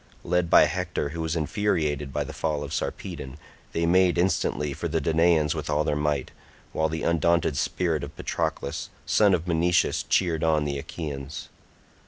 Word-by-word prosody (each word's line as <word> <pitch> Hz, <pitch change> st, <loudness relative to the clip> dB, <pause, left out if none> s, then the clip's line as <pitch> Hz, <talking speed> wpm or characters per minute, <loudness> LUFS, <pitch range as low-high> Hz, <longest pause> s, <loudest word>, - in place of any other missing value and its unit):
Led 90 Hz, 0 st, +1 dB
by -, -, +8 dB
Hector, 70 Hz, -, -2 dB
who 80 Hz, +3 st, -5 dB
was 80 Hz, 0 st, -1 dB
infuriated 75 Hz, -4 st, -1 dB
by -, -, -1 dB
the -, -, -8 dB
fall 75 Hz, -3 st, -2 dB
of 70 Hz, -, -6 dB
Sarpedon, 65 Hz, +1 st, -4 dB, 0.3 s
they 85 Hz, -, 0 dB
made 90 Hz, +1 st, +4 dB
instantly 80 Hz, -5 st, 0 dB
for 85 Hz, -, -3 dB
the 80 Hz, 0 st, 0 dB
Danaans 80 Hz, 0 st, +3 dB
with 75 Hz, -2 st, -5 dB
all 75 Hz, 0 st, +2 dB
their 75 Hz, -, 0 dB
might, 75 Hz, -2 st, -1 dB, 0.4 s
while 80 Hz, 0 st, +1 dB
the 80 Hz, 0 st, -4 dB
undaunted 85 Hz, -2 st, +2 dB
spirit 80 Hz, -1 st, 0 dB
of 70 Hz, +1 st, -7 dB
Patroclus 70 Hz, -, -3 dB, 0.2 s
son 100 Hz, -3 st, +4 dB
of 85 Hz, 0 st, -5 dB
Menoetius 85 Hz, +1 st, +2 dB
cheered 85 Hz, -4 st, +2 dB
on 80 Hz, -2 st, +2 dB
the 70 Hz, -1 st, -2 dB
Achaeans. 70 Hz, -1 st, -6 dB
80 Hz, 170 wpm, -26 LUFS, 75-85 Hz, 0.4 s, by